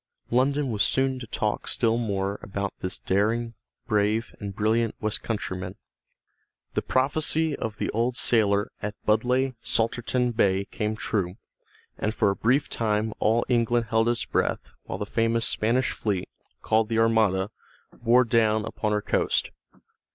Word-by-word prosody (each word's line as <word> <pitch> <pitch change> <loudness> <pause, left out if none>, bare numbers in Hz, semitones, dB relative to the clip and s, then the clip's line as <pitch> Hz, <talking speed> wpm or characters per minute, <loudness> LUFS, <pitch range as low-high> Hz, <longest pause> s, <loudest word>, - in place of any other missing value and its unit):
London 135 +2 +2
was 105 -2 -1
soon 130 +3 +2
to 120 - -8
talk 105 -1 -2
still 115 -2 +2
more 100 -3 -2
about 100 0 -4
this 90 - -3
daring, 115 +4 0 0.3
brave, 105 +1 0
and 100 -2 -6
brilliant 110 +2 +1
Westcountryman. 100 -4 -3 1.0
The - - 0
prophecy 155 +3 +1
of 110 -1 -5
the - - -2
old 120 +3 0
sailor 105 -3 +2
at 105 0 -4
Budleigh 125 +5 +2
Salterton 120 +2 +1
Bay 100 -4 +2
came 105 0 -3
true, 95 -5 -2 0.6
and 110 +1 -1
for 100 - +3
a - - -3
brief 130 +8 +2
time 110 -1 -1
all 115 +2 +2
England 120 -1 +1
held 115 +1 +3
its 120 -1 0
breath - - -1
while - - -4
the 105 - -3
famous 115 +2 +1
Spanish 120 +4 +1
fleet, 100 -4 -2 0.4
called 110 0 +2
the 115 - 0
Armada, 110 -3 +2 0.4
bore 120 +1 +4
down 110 -2 +2
upon 105 0 -2
her 105 0 0
coast. - - 0
110 Hz, 145 wpm, -26 LUFS, 105-120 Hz, 1.0 s, bore